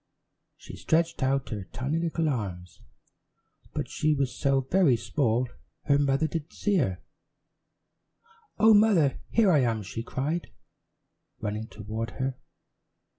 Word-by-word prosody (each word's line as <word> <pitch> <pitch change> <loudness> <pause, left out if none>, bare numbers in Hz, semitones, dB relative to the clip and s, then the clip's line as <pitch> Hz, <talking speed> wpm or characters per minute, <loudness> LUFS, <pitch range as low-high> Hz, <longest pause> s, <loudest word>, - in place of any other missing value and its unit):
She - - -11
stretched 165 0 +1
out 135 0 +1
her 105 -5 -5
tiny 140 - -2
little 165 -1 -1
arms, 95 - -4 0.9
but - - -3
she 155 0 +1
was 135 -3 -1
so 135 -1 +2
very 145 0 +3
small 125 -1 0 0.4
her 140 -1 +3
mother 140 +2 +2
didn't 155 0 -4
see 205 -1 +1
her. 95 - -1 1.5
"Oh, 220 +1 +6
Mother, 205 -10 +4
here 220 -5 +4
I 155 - +5
am," 115 -4 0
she 100 +4 -5
cried, 145 +8 -3 0.9
running 105 +1 -3
toward 110 +2 -5
her. 130 0 -1
135 Hz, 125 wpm, -27 LUFS, 115-160 Hz, 1.5 s, Oh